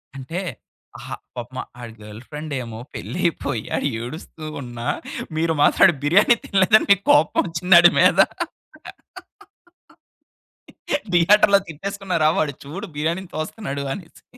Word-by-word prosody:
అంటే 135 +6 -5 0.6
అహా! - - -7 0.2
పాపమా 125 +1 -6 0.2
ఆడి 120 -2 -9
గర్ల్‌ఫ్రెండేమో 120 +2 -7
పెళ్ళైపోయి 145 -9 -2
ఆడు - - 0
ఏడుస్తూ 155 +5 -8 0.2
ఉన్నా 120 -2 -7 0.5
మీరు 165 0 +1
మాత్రం - - +4
ఆడి 170 - +1
బిర్యానీ 190 +10 +5
తినలేదని 200 +3 +4
మీకు 200 0 +4
కోపం 150 +1 +3
ఒచ్చిందాడి 175 +1 +6
మీద. - - +4 2.9
థియేటర్‌లో 200 +4 +5
తిట్టేసుకున్నారా? 180 -1 -1
వాడు 145 -2 0
చూడు 180 +9 -7
బిర్యానీని 170 +4 -2
తోస్తున్నాడు 155 -3 -4
అనేసి. 180 -4 -12
160 Hz, 105 wpm, -21 LUFS, 135-185 Hz, 2.9 s, ఒచ్చిందాడి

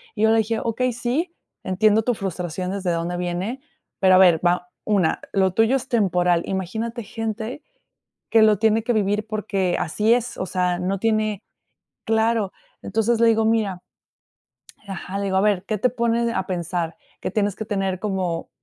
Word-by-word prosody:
Y 215 - -1
yo 220 - +5
le 225 - +4
dije: 220 +1 0
"Okey, 250 +2 0
sí, 270 +9 -2 0.3
entiendo 210 +3 +3
tu 245 +1 0
frustración 180 -2 -4
desde 195 -2 -2
dónde 170 +1 -2
viene, 180 +8 -3 0.4
pero 185 -1 +5
a - - +7
ver 175 -4 +6
va, 180 0 +1 0.2
una, 195 -6 +1
lo 190 -2 +2
tuyo 225 +6 +3
es 265 - -7
temporal. 180 -7 +2
Imagínate 220 +6 -3
gente 225 +4 -5 0.7
que 225 - +5
lo 215 -2 +5
tiene 220 +1 +3
que 240 - +1
vivir 210 0 +1
porque 200 -4 -1
así 210 +7 +2
es". 245 0 -2
O 185 - -2
sea, 180 -1 0
no 190 +2 -1
tiene 215 -1 0 0.6
Claro. 220 -2 +1 0.3
Entonces 225 +3 +1
le 230 - +5
digo: 225 -1 +3
"Mira". 210 -5 0 1.1
Ajá, 195 0 -5
le 200 - -2
digo: 190 -1 0
"A - - +4
ver, 200 -3 +2
qué 215 0 -1
te 250 - +3
pones 235 -1 0
a 190 - -1
pensar, 170 -2 -3 0.3
que - - -3
tienes 205 -1 0
que - - -5
tener 195 -3 -1
como, 185 -5 -2
205 Hz, 175 wpm, -22 LUFS, 185-225 Hz, 1.1 s, a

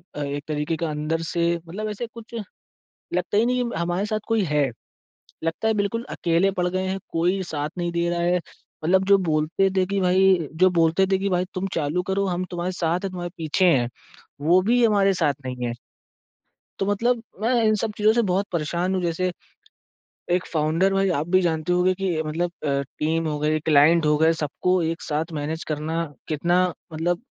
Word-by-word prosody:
अ, - - -5
एक 145 0 -4
तरीक़े 155 +1 -1
का 165 -1 -2
अंदर 155 +2 -2
से 170 +1 0
मतलब 180 +6 -6
ऐसे 210 +3 -4
कुछ 230 0 -13 0.8
लगता 205 - 0
ही 220 - +4
नहीं 250 0 +1
है 235 -8 -4
हमारे 175 +3 0
साथ 215 0 -1
कोई 225 -2 +2
है। 150 -3 +2 0.8
लगता 165 +7 -1
है 220 - +2
बिल्कुल 210 +3 -1
अकेले 170 +3 +1
पड़ 180 - +2
गए 185 +1 -1
हैं 190 +1 -2
कोई 180 +4 +1
साथ 150 -3 -3
नहीं 175 0 -1
दे 170 0 0
रहा 175 0 -1
है, 175 +1 +2 0.5
मतलब 190 +3 +3
जो 200 0 +6
बोलते 155 +5 +2
थे 190 - +4
कि 200 +1 -1
भाई 185 -3 +3
जो 185 +3 +4
बोलते 165 +4 +3
थे 190 - +4
कि 195 +1 -1
भाई 180 -1 +1
तुम 185 0 -2
चालू 160 +3 0
करो 195 +1 +1
हम 180 -1 -1
तुम्हारे 175 +1 -2
साथ 175 -1 0
हैं 195 - -1
तुम्हारे 175 -1 -5
पीछे 160 +3 0
हैं 120 -5 +2 0.6
वो 175 +3 +6
भी 245 0 +4
हमारे 200 -3 +4
साथ 155 -5 +1
नहीं 125 -1 -3
है। 120 - -2 1.1
तो 195 - +1
मतलब 230 +4 +1 0.2
मैं 230 +4 +2
इन 215 -1 +4
सब 225 - -1
चीज़ों 215 +1 +4
से 235 - +3
बहुत 190 +3 +1
परेशान 175 +3 -1
हूँ। 185 - 0
जैसे 175 +2 0 1.0
एक 180 +1 +1
फ़ाउंडर 165 +5 +2
भाई 195 0 +2
आप 155 - -3
भी 185 +1 +4
जानते 165 0 0
होंगे 180 +1 +3
कि 180 -4 -1
मतलब 170 +3 -1
अ, 140 -1 +1 0.2
टीम 160 +1 0
हो 150 -1 -2
गई 155 +1 +1
क्लाइंट 155 +2 +4
हो 150 0 +3
गए 160 +2 +4
सबको 170 +4 0
एक 165 +1 -2
साथ 155 +3 -2
मैनेज 160 +3 -3
करना 160 +2 -2 0.2
कितना 175 +4 +2 0.3
मतलब 170 +4 -1
175 Hz, 200 wpm, -24 LUFS, 160-195 Hz, 1.1 s, जो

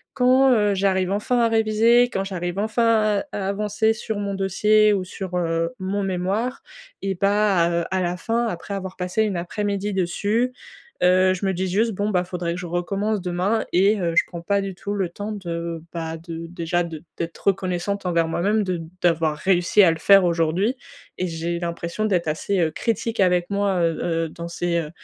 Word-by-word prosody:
quand, 260 +1 +5
heu, 210 -3 +2
j'arrive 190 -1 +1
enfin 225 +5 0
à 230 - +4
réviser. 225 +2 +4
Quand 195 - -1
j'arrive 175 -1 -4
enfin 220 -1 +2
à - - -4
à 195 -1 -2
avancer 210 +2 +1
sur 220 -1 -4
mon 200 -1 -2
dossier 210 +2 +3
ou 190 -2 0
sur, 185 0 -6
heu, 165 +3 -1
mon 195 +2 -2
mémoire 195 +7 -2 0.4
et 195 -1 -2
bah, 200 -3 +2
heu, 170 0 0
à 190 0 +1
la 175 0 -1
fin 230 +5 -1
après 185 +1 -5
avoir 190 -1 -6
passé 180 +4 0
une 200 -4 -1
après-midi 200 +3 -2
dessus, 205 +7 0 0.5
heu, 185 +1 +5
je 185 +2 -4
me 190 - +1
dis 185 +1 -2
juste: 220 +5 +1
«Bon 205 +2 -1
bah 180 -3 +1
faudrait 175 -2 -3
que - - -6
je 180 - -6
recommence 195 +4 -1
demain» 185 +5 0
et 200 +3 +4
heu, 170 -1 0
je - - +7
prends 170 -1 -8
pas 200 +3 +1
du 195 -2 -5
tout 205 +2 -5
le 195 -3 0
temps 205 +5 -6
de, 170 -4 -4
bah, 165 -1 -4
de 165 0 -7
déjà 175 0 -1
de 165 -1 -7
d'être 170 0 -4
reconnaissante 190 +1 0
envers 170 -2 +1
moi-même, 205 +6 +1
de 180 -3 -2 0.2
d'avoir 165 -3 +2
réussi 185 +3 +3
à 170 - +6
le 160 - -4
faire 195 +1 +6
aujourd'hui 175 +8 +1 0.4
et 185 - -1
j'ai 170 +1 -3
l'impression 170 +4 -4
d'être 180 -6 0
assez, 180 +5 -1
heu, 160 -2 +2
critique 230 +2 -1
avec 180 -1 +2
moi, 200 -2 0
heu 165 -1 +1
heu, 165 -1 0
dans 170 +1 -7
ces, 170 0 -1
heu, 150 -2 -4
190 Hz, 200 wpm, -23 LUFS, 170-205 Hz, 0.5 s, je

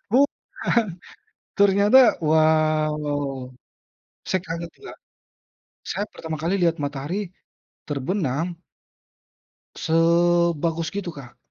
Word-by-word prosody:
Bukan. 250 -3 +1 0.7
Ternyata 200 +4 +5 0.3
wah 155 0 +3
wah 145 -1 -1
wah. 135 -2 -4 0.8
Saya 185 - +1
kaget 170 +1 -4
tuh, - - -25
Kak. - - -12 1.0
Saya 205 - -2
pertama 160 -1 -5
kali 170 +4 0
lihat 170 -1 +3
matahari 150 +8 -4 0.6
terbenam 145 +1 -1 1.3
sebagus 170 0 +2
gitu 195 -5 -5
Kak. 130 -4 -12
165 Hz, 95 wpm, -23 LUFS, 155-185 Hz, 1.3 s, Ternyata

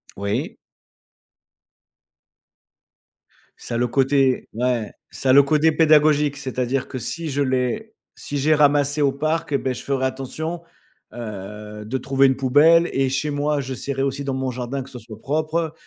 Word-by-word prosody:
Oui. 100 +1 -3 3.0
Ça - - -6
a - - +1
le 120 +1 +1
côté 135 +1 +2
ouais, 120 -2 -1 0.2
ça 130 - -3
a - - +6
le 140 +1 +8
côté 155 +3 +3
pédagogique, 150 -2 +4
c'est-à-dire 130 0 -2
que 130 - -6
si 160 +7 -4
je 145 +1 -1
l'ai 130 - -1 0.2
si 145 - -5
j'ai 155 +3 +3
ramassé 145 0 +3
au 140 - +3
parc 155 +3 -2
et 140 - +3
beh, 130 -1 -2
je 120 - -8
ferai 135 -1 -1
attention, 135 +6 -4 0.5
heu, 105 -1 -8
de 125 +5 -2
trouver 135 +1 +3
une 130 - +2
poubelle 150 +6 +4
et 135 -1 +1
chez 140 +3 -1
moi 145 0 0
j'essaierai 135 +1 -4
aussi 140 +1 -2
dans 135 - -2
mon 130 -1 -2
jardin 125 +2 -4
que 135 - -14
ce 125 -2 -9
soit 110 -2 -12
propre. 155 +4 -1
135 Hz, 165 wpm, -22 LUFS, 125-150 Hz, 3.0 s, le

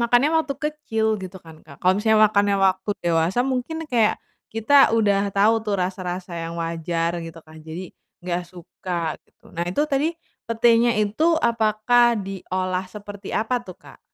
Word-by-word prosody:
makannya 245 +5 +3
waktu 275 - -5
kecil 275 -8 -1
gitu 185 0 -8
kan 160 -2 -15
Kak, 140 -3 -15
kalau 185 +1 +4
misalnya 220 0 +3
makannya 200 -1 +2
waktu 190 +1 +1
dewasa 175 +8 +1
mungkin 270 +5 -3
kayak, 235 -6 +2 0.3
kita 270 +6 +5
udah 205 -3 +2
tahu 215 +3 +3
tuh 205 -3 -1
rasa-rasa 180 -1 -4
yang 165 0 -5
wajar 165 0 -2
gitu 165 0 -9
kan, 155 0 -14
jadi 165 +3 -8 0.3
enggak 175 0 -1
suka 175 -2 -5
gitu. - - -22
Nah 170 - -2
itu 295 +10 0
tadi 290 +3 +1 0.4
petenya 230 +1 +4
itu 310 +11 +2
apakah 235 0 +3
diolah 185 -1 -3
seperti 205 -1 -9
apa 240 +3 -1
tuh 185 -5 -12
Kak? - - -16
205 Hz, 155 wpm, -23 LUFS, 180-235 Hz, 0.4 s, kita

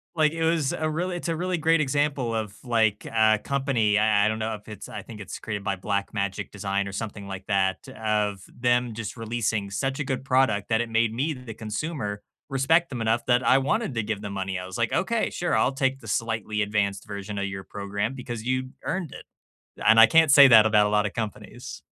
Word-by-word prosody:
Like, 155 -1 +3
it 165 0 -2
was 160 -4 +1
a 155 - -1
real 175 +4 -2
it's 175 -1 -4
a 165 - 0
really 180 +2 -1
great 165 0 +3
example 140 -4 0
of, 105 -2 -3
like, 110 -4 +1
a 110 -1 +3
company 135 -7 +1
I 105 -1 +3
I - - +4
don't 110 - -2
know 110 0 -2
if 105 +1 -14
it's 105 - -8
I 105 - -6
think 110 -2 -11
it's 105 - -7
created 100 -2 -5
by 100 0 -1
Black 100 +1 -2
Magic 100 -1 -3
Design 100 0 -2
or - - -5
something 105 -1 -5
like 95 -1 -7
that, 95 -2 0
of 105 -3 -1
them 120 -1 0
just 115 +1 -6
releasing 110 -3 -2
such 135 +6 -2
a 150 - 0
good 130 0 -3
product 130 -7 +2
that 110 -1 +2
it 120 - -4
made 115 0 +2
me, 140 +7 -1
the 125 -4 -9
consumer, 110 -1 -4 0.3
respect 160 +5 +2
them 125 -4 -5
enough 115 +1 +1
that 125 0 +4
I 130 - +6
wanted 135 - 0
to 115 - 0
give 105 -1 -3
them 100 -2 -6
money. 95 -1 -3
I 90 - -6
was, 95 - -7
like, - - 0
"Okay, - - 0
sure, - - -1
I'll - - +3
take 135 0 0
the 115 - -12
slightly 110 0 -1
advanced 100 -1 -1
version 100 0 -6
of 100 - -1
your 95 -1 -6
program 100 +5 -4
because 120 -4 -6
you 130 0 -1
earned 180 -6 -3
it." - - -10 0.6
And, 115 - +6
I 115 - +11
can't 165 -1 +5
say 140 -1 +9
that 110 -3 +8
about 105 -1 +4
a - - -2
lotta 105 -1 +2
companies. 110 -3 -6
110 Hz, 225 wpm, -25 LUFS, 105-135 Hz, 0.6 s, I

